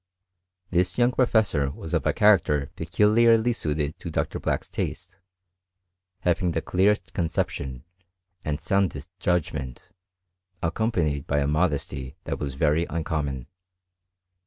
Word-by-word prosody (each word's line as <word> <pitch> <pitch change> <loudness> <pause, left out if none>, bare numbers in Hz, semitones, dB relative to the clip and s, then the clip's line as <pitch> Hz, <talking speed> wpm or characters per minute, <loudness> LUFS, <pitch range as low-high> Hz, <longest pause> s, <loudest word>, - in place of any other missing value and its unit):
This 90 0 +1
young 120 0 +4
professor 110 - +2
was 80 +3 -8
of - - +1
a - - +4
character 75 -9 +3
peculiarly 115 +2 +4
suited 75 -6 -2
to - - -6
Dr. - - -2
Black's - - -1
taste, 90 +3 -5 1.0
having 90 0 +1
the - - 0
clearest 100 +3 +1
conception, 70 - -2 0.6
and 75 0 -2
soundest 90 -7 0
judgment, 75 -8 -2 0.7
accompanied 80 -6 0
by 70 - +1
a 70 - +2
modesty 70 -4 -1
that - - -4
was 70 -2 -4
very 80 +3 +2
uncommon. 75 -5 -2
80 Hz, 115 wpm, -25 LUFS, 75-100 Hz, 1.0 s, young